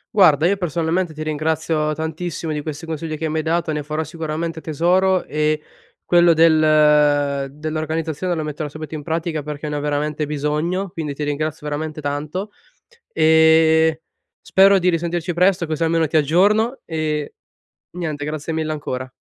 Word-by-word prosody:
Guarda, 165 Hz, -5 st, +5 dB
io 200 Hz, -, +2 dB
personalmente 170 Hz, -1 st, -1 dB
ti 155 Hz, 0 st, -6 dB
ringrazio 155 Hz, 0 st, -1 dB
tantissimo, 160 Hz, 0 st, -4 dB
di 150 Hz, -, -3 dB
questi 155 Hz, +2 st, -6 dB
consigli 160 Hz, -1 st, -4 dB
che 160 Hz, +1 st, -2 dB
mi 155 Hz, -, -3 dB
hai 155 Hz, -, -1 dB
dato 165 Hz, 0 st, 0 dB
e -, -, -2 dB
ne 150 Hz, -1 st, -3 dB
farò 155 Hz, +1 st, -3 dB
sicuramente 160 Hz, +1 st, -4 dB
tesoro, 180 Hz, +4 st, +1 dB
e 150 Hz, 0 st, 0 dB, 0.4 s
quello 175 Hz, -1 st, +5 dB
del 150 Hz, -3 st, +4 dB
dell'organizzazione 160 Hz, +3 st, -3 dB
lo 160 Hz, -, -2 dB
metterò 150 Hz, 0 st, -4 dB
subito 155 Hz, +1 st, -8 dB
in 150 Hz, -, -6 dB
pratica, 160 Hz, -1 st, -2 dB
perché 150 Hz, +1 st, -6 dB
ne 150 Hz, -, -3 dB
ho 145 Hz, -, -2 dB
veramente 150 Hz, +1 st, -1 dB
bisogno. 150 Hz, +6 st, -1 dB
Quindi 160 Hz, -5 st, -4 dB
ti 150 Hz, -, -4 dB
ringrazio 150 Hz, +1 st, -3 dB
veramente 155 Hz, +1 st, -4 dB
tanto, 150 Hz, +8 st, -4 dB, 0.6 s
ehm, 160 Hz, 0 st, +5 dB, 0.5 s
spero 195 Hz, +1 st, +5 dB
di 180 Hz, -1 st, +2 dB
risentirci 170 Hz, 0 st, -1 dB
presto, 180 Hz, 0 st, +2 dB
così 160 Hz, +1 st, -2 dB
almeno 165 Hz, 0 st, +2 dB
ti 155 Hz, -, 0 dB
aggiorno 205 Hz, -, +3 dB
e 155 Hz, -2 st, -3 dB, 0.6 s
niente. 155 Hz, -4 st, -3 dB
Grazie 155 Hz, +1 st, -4 dB
mille 160 Hz, -1 st, -2 dB
ancora. 130 Hz, -4 st, -4 dB
155 Hz, 160 wpm, -20 LUFS, 150-165 Hz, 0.6 s, Guarda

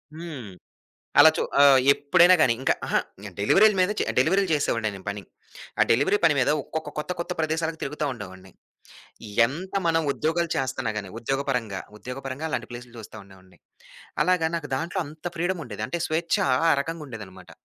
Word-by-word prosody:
హ్మ్. 155 Hz, -, -8 dB, 0.7 s
అలా 160 Hz, +2 st, +9 dB
చూ -, -, 0 dB, 0.2 s
ఆహ్, 140 Hz, -2 st, +7 dB
ఎప్పుడైనా 175 Hz, +6 st, +5 dB
గానీ 125 Hz, -, +5 dB
ఇంకా -, -, +2 dB
ఆహా! -, -, +2 dB, 0.4 s
డెలివరీల 200 Hz, -, +5 dB
మీద 185 Hz, +1 st, +3 dB
చే -, -, +1 dB
డెలివరీలు 185 Hz, +8 st, +3 dB
చేసేవాడిని 115 Hz, -7 st, 0 dB
నేను 95 Hz, -1 st, -11 dB
పని. 100 Hz, 0 st, -4 dB, 0.6 s
ఆ -, -, +8 dB
డెలివరీ 145 Hz, -, +3 dB
పని 155 Hz, -3 st, +5 dB
మీద 130 Hz, +2 st, +3 dB, 0.3 s
ఒక్కొక్క 155 Hz, -2 st, -8 dB
కొత్త 165 Hz, +4 st, -3 dB
కొత్త 170 Hz, +1 st, -3 dB
ప్రదేశాలకి 160 Hz, 0 st, -1 dB
తిరుగుతూ 150 Hz, +2 st, -3 dB
ఉండేవాడిని. 95 Hz, -4 st, -10 dB, 1.0 s
ఎంత 170 Hz, +10 st, -7 dB
మనం 165 Hz, 0 st, +2 dB
ఉద్యోగాలు 165 Hz, +3 st, -1 dB
చేస్తన్నా 130 Hz, -3 st, -2 dB
గానీ 100 Hz, -3 st, -5 dB
ఉద్యోగపరంగా, 125 Hz, -6 st, -2 dB, 0.2 s
ఉద్యోగపరంగా 130 Hz, +4 st, -6 dB
అలాంటి -, -, -3 dB
ప్లేసులు 120 Hz, 0 st, -10 dB
చూస్తా 110 Hz, 0 st, -11 dB
ఉండేవాడిని. 95 Hz, -1 st, -19 dB, 0.7 s
అలాగా 180 Hz, -1 st, +2 dB
నాకు 165 Hz, -3 st, -4 dB
దాంట్లో 165 Hz, +6 st, -3 dB
అంత 155 Hz, +3 st, -14 dB
ఫ్రీడముండేది. 165 Hz, -, -3 dB
అంటే 175 Hz, -, -3 dB
స్వేచ్చా 165 Hz, 0 st, 0 dB, 0.2 s
ఆ -, -, +5 dB
రకంగా 165 Hz, +3 st, -5 dB
ఉండేదనమాట. 100 Hz, -7 st, -11 dB
145 Hz, 155 wpm, -25 LUFS, 115-165 Hz, 1.0 s, అలా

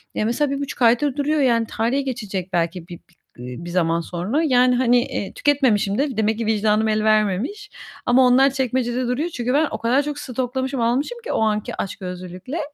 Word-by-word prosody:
Ya, 215 Hz, -, 0 dB
mesela 270 Hz, +5 st, 0 dB
1,5 280 Hz, -1 st, -4 dB
aydır 245 Hz, +4 st, +3 dB
duruyor, 300 Hz, +2 st, +1 dB
yani 235 Hz, -4 st, +2 dB
tarihi 240 Hz, +6 st, 0 dB
geçecek 205 Hz, -8 st, -5 dB
belki 170 Hz, 0 st, -1 dB
bi 175 Hz, -, -9 dB
bi -, -, -32 dB, 0.2 s
eee, 125 Hz, +1 st, -7 dB
bir 175 Hz, -, -6 dB
zaman 170 Hz, -1 st, +1 dB
sonra, 185 Hz, -, -2 dB
yani, 250 Hz, -4 st, +4 dB
hani, 245 Hz, -1 st, +4 dB
eee, 195 Hz, -, -5 dB
tüketmemişim 245 Hz, -9 st, +1 dB
de, 275 Hz, -4 st, -1 dB
demek 220 Hz, 0 st, +1 dB
ki 230 Hz, -, -3 dB
vicdanım 215 Hz, 0 st, +2 dB
el 215 Hz, 0 st, +1 dB
vermemiş. 215 Hz, -, 0 dB, 0.4 s
Ama 255 Hz, +1 st, +5 dB
onlar 265 Hz, +2 st, +5 dB
çekmecede 255 Hz, -1 st, -1 dB
duruyor. 285 Hz, +8 st, -1 dB
Çünkü 250 Hz, -5 st, -2 dB
ben 300 Hz, +2 st, +3 dB
o -, -, -3 dB
kadar 250 Hz, +5 st, +1 dB
çok 290 Hz, 0 st, -4 dB
stoklamışım, 260 Hz, 0 st, -3 dB
almışım 265 Hz, -, 0 dB
ki -, -, -3 dB
o -, -, 0 dB
anki 215 Hz, -1 st, 0 dB
açgözlülükle, 185 Hz, -, -6 dB
240 Hz, 190 wpm, -21 LUFS, 210-270 Hz, 0.4 s, Ama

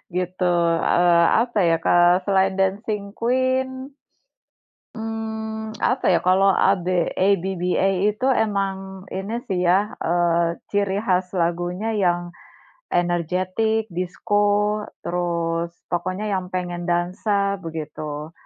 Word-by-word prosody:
gitu. 180 Hz, +1 st, -2 dB, 0.5 s
Eee, 175 Hz, -1 st, +4 dB, 0.2 s
apa 240 Hz, -3 st, -2 dB
ya, 165 Hz, -, +4 dB
ke -, -, -1 dB, 0.4 s
selain 195 Hz, -1 st, +3 dB
Dancing 200 Hz, +1 st, -1 dB
Queen, 260 Hz, +2 st, 0 dB, 1.0 s
mmm, 220 Hz, -1 st, -5 dB
apa 255 Hz, +1 st, 0 dB
ya, 175 Hz, -, +4 dB
kalau 195 Hz, +2 st, +5 dB
AB 190 Hz, -1 st, +2 dB, 0.3 s
ABBA 190 Hz, -1 st, +1 dB, 0.2 s
itu 215 Hz, +5 st, -4 dB, 0.2 s
emang 195 Hz, -2 st, -3 dB
ini 200 Hz, +5 st, -3 dB
sih 190 Hz, -3 st, -1 dB
ya, 190 Hz, +4 st, +2 dB
eee, 170 Hz, 0 st, +1 dB
ciri 200 Hz, -1 st, 0 dB
khas 185 Hz, -4 st, 0 dB
lagunya 175 Hz, +3 st, -1 dB
yang 175 Hz, -1 st, +2 dB, 0.7 s
energetik, 185 Hz, +5 st, 0 dB
disko, 185 Hz, +4 st, 0 dB, 0.6 s
terus 170 Hz, -1 st, -2 dB, 0.2 s
pokoknya 185 Hz, +4 st, -2 dB
yang 185 Hz, -2 st, -2 dB
pengen 175 Hz, -1 st, -4 dB
dansa, 200 Hz, +3 st, 0 dB
begitu. 155 Hz, -2 st, -6 dB
190 Hz, 105 wpm, -22 LUFS, 175-210 Hz, 1.0 s, kalau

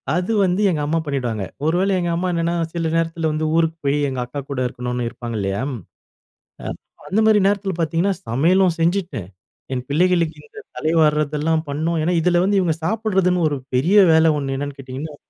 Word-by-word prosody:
அது 180 Hz, +4 st, -1 dB
வந்து 185 Hz, +2 st, +1 dB
எங்க 160 Hz, -5 st, -1 dB
அம்மா 165 Hz, +2 st, 0 dB
பண்ணிடுவாங்க. 125 Hz, -7 st, -2 dB, 0.2 s
ஒரு 160 Hz, +2 st, +2 dB
வேளை 195 Hz, +1 st, +1 dB
எங்க 175 Hz, -, -1 dB
அம்மா 180 Hz, +2 st, -1 dB
என்னன்னா 170 Hz, 0 st, 0 dB, 0.2 s
சில 165 Hz, -1 st, -1 dB
நேரத்தில 165 Hz, -1 st, 0 dB
வந்து 155 Hz, +1 st, -1 dB
ஊருக்கு 165 Hz, 0 st, +1 dB
போய் 140 Hz, +1 st, +2 dB
எங்க 130 Hz, -1 st, -4 dB
அக்கா 125 Hz, +4 st, -6 dB
கூட 140 Hz, -, -3 dB
இருக்கணும்னு 125 Hz, 0 st, -3 dB
இருப்பாங்க 120 Hz, -1 st, -7 dB
இல்லையா. 100 Hz, +3 st, -2 dB, 1.0 s
அ -, -, -8 dB, 0.4 s
அந்த 200 Hz, -, +1 dB
மாரி 215 Hz, -1 st, +5 dB
நேரத்தில 200 Hz, -1 st, 0 dB
பாத்தீங்கன்னா, 165 Hz, +4 st, +1 dB
சமையலும் 170 Hz, +9 st, +3 dB
செஞ்சிட்டு, 170 Hz, -, 0 dB, 0.5 s
என் 125 Hz, -, -3 dB
பிள்ளைகளுக்கு 170 Hz, +1 st, +2 dB
இந்த 430 Hz, -1 st, -12 dB, 0.2 s
தலைவார்றதெல்லாம் 155 Hz, 0 st, +1 dB
பண்ணணும். 160 Hz, +3 st, -1 dB
ஏன்னா 175 Hz, +3 st, +1 dB
இதில 175 Hz, +1 st, +3 dB
வந்து 200 Hz, +1 st, +2 dB
இவுங்க 170 Hz, -4 st, +1 dB
சாப்பிட்றதுன்னு 190 Hz, -5 st, +1 dB
ஒரு 145 Hz, -, -2 dB, 0.2 s
பெரிய 170 Hz, +11 st, +3 dB, 0.2 s
வேலை 160 Hz, 0 st, +5 dB
ஒண்ணு 135 Hz, -1 st, -3 dB
என்னன்னு 145 Hz, 0 st, -5 dB
கேட்டீங்கன்னா, 135 Hz, +3 st, -7 dB
160 Hz, 175 wpm, -21 LUFS, 140-180 Hz, 1.0 s, மாரி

